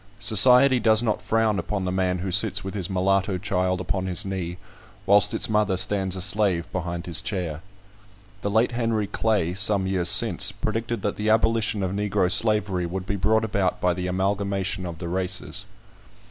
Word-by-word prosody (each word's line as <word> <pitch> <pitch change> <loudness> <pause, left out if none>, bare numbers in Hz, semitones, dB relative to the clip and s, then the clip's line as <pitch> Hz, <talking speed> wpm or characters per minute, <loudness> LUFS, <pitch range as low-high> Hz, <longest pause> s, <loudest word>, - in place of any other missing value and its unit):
Society 125 +6 +5
does 110 0 +3
not 110 -3 -1
frown 110 -2 0
upon 100 -3 -4
the 90 - -2
man 90 -1 -1
who 95 - -3
sits 100 +1 +3
with 95 - -6
his 95 -3 -3
mulatto 95 +1 0
child 90 -1 -2
upon 95 +1 -3
his 95 +3 +2
knee, 90 -3 -5 0.5
whilst 100 +1 +4
its - - +1
mother 105 -3 0
stands 95 0 0
a 95 - -1
slave 100 -4 +1
behind 85 -1 -5
his 85 -2 +2
chair. 85 -6 -4 0.8
The 100 - -2
late 110 +4 +1
Henry 115 -3 -1
Clay, 100 -4 -1
some 100 0 +1
years 95 -2 +1
since, - - +4
predicted 115 0 -4
that 105 - -3
the 105 +1 -2
abolition 110 -2 +1
of 95 - -2
Negro 100 -2 -1
slavery 100 -5 +1
would 90 +2 -6
be 100 - -3
brought 110 +4 +1
about 100 -3 -1
by 90 -1 +1
the 90 +1 -5
amalgamation 95 0 -2
of 85 -1 -8
the 85 0 -7
races. 95 +2 -3
95 Hz, 180 wpm, -23 LUFS, 90-105 Hz, 0.8 s, Society